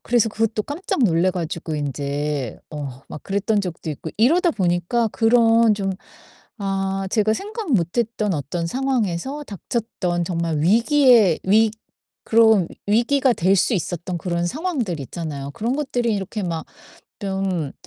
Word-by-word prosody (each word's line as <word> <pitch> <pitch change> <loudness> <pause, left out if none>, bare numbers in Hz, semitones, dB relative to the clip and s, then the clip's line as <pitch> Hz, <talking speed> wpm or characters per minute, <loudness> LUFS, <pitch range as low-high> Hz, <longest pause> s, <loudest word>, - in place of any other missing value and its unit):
그래서 235 -2 +3
그것도 220 0 -1
깜짝 290 - -2
놀라 175 -1 +3
가지고 165 -2 -4
인제 145 -2 -3
어 140 -4 -7
막 - - -8
그랬던 200 +2 0
적도 170 -3 -5
있고 155 +2 -6
이러다 335 - +4
보니깐 185 - +1
그런 230 -1 +4
좀 195 -1 -2 0.7
아 195 0 -1
제가 215 0 +2
생각 415 - -4
못 175 -4 +1
했던 215 -4 0
어떤 155 +4 -3
상황에서 260 - -1
닥쳤던 200 -5 -3
정말 170 -3 -1
위기의 230 - +5
위 215 +3 +4 0.5
그런 220 -6 +4 0.2
위기가 245 +5 +3
될 195 -2 +2
수 215 - +2
있었던 175 -1 -3
그런 170 0 -2
상황들 260 - -2
있잖아요. 140 0 -6
그런 230 - -2
것들이 245 -6 0
이렇게 200 +2 -4
막 165 -3 -3 0.5
좀 190 -6 -2
195 Hz, 285 characters per minute, -22 LUFS, 170-230 Hz, 0.7 s, 위기의